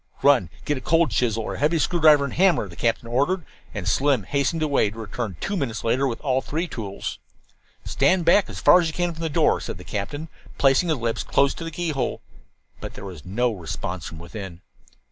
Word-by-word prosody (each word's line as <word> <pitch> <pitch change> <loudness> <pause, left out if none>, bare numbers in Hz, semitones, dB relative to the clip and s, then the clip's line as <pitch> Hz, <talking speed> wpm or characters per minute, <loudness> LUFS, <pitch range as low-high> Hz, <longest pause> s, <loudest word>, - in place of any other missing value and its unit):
"Run 135 - +5 0.2
get 145 -3 -1
a - - -15
cold 165 -1 +2
chisel 115 0 0
or - - -4
a - - -6
heavy 155 +4 +2
screwdriver 155 -3 +4
and 140 - -3
hammer," 175 - +3
the 85 - -12
captain 115 +3 -1
ordered, 145 +9 0 0.3
and 90 - -5
Slim 135 +2 +2
hastened 140 - 0
away, 140 -8 +2
to 105 - -12
return 110 -2 -5
two 200 - -2
minutes 135 - -3
later 130 +4 +1
with 120 - -3
all 130 -2 +1
three 165 +6 -3
tools. 100 - -5 0.7
"Stand 170 +5 +2
back 185 +5 +4
as - - -7
far 180 - +7
as 165 - -1
you 160 - -4
can 175 0 -1
from 165 - -10
the 165 - -1
door," - - +2
said - - -5
the - - -11
captain, 145 +10 -4 0.3
placing 135 +5 +3
his 155 - +1
lips 115 -1 -2
close 140 0 +2
to - - -8
the 165 - -4
keyhole. 160 -5 -2 0.6
But - - -8
there - - -8
was 90 -6 -9
no 120 +6 0
response 90 -2 -5
from 80 - -9
within. 85 +1 -8
135 Hz, 215 wpm, -24 LUFS, 110-160 Hz, 0.7 s, far